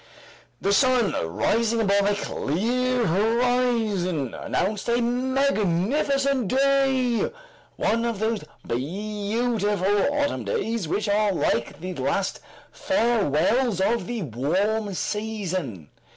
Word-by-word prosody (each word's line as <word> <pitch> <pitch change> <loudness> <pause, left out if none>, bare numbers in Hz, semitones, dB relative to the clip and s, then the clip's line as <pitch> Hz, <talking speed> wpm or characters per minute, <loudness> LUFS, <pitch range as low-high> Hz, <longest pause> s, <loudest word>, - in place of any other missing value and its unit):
The 200 - +1
sun 250 -1 +3 0.2
rising 225 - +1
above 200 -2 +2
a 205 - +1
clear 240 - -1
horizon, 215 - +1
announced 200 +4 -2
a 235 +1 +2
magnificent 260 - +1
day, 270 - +2 0.4
one 230 +2 0
of 230 -3 -1
those 220 -1 -1 0.2
beautiful 205 - -1
autumn 290 0 -1
days 230 - -2
which 205 +6 -1
are 205 0 +2
like 120 -7 -1
the 185 +1 -4
last - - -1 0.3
farewells 230 - +1
of 195 0 +1
the 235 -4 -3
warm 190 - -1
season. 185 - -3
215 Hz, 100 wpm, -24 LUFS, 190-245 Hz, 0.4 s, sun